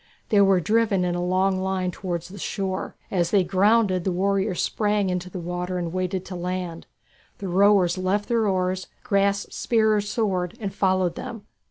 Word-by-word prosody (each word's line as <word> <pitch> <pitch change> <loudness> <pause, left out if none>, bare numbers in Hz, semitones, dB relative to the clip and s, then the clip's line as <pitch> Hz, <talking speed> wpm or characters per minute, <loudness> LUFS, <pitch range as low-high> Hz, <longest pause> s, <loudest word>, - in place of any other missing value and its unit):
They 205 -2 +5
were 195 -2 +5
driven 210 -1 +2
in 175 - 0
a 175 0 -2
long 185 +1 +1
line 190 -1 -1
towards 175 -1 -4
the 200 +2 -10
shore. 190 0 -3 0.2
As 175 -3 +1
they 200 -3 +3
grounded, 195 0 +3
the 190 - 0
warriors 195 0 0
sprang 205 -3 +1
into 180 0 -3
the 185 - -7
water 180 +1 -3
and 170 -1 -3
waded 185 0 -2
to 185 - -7
land. 180 -1 -4 0.5
The 195 - -5
rowers 185 -1 +4
left 195 +3 0
their 230 -3 +1
oars, 185 -1 -1 0.2
grasped 200 0 +1
spear 220 -2 +2
or 210 - +2
sword, 200 -2 -2
and 200 -4 -4
followed 185 -3 +1
them. 225 +4 -7
190 Hz, 180 wpm, -24 LUFS, 180-200 Hz, 0.5 s, They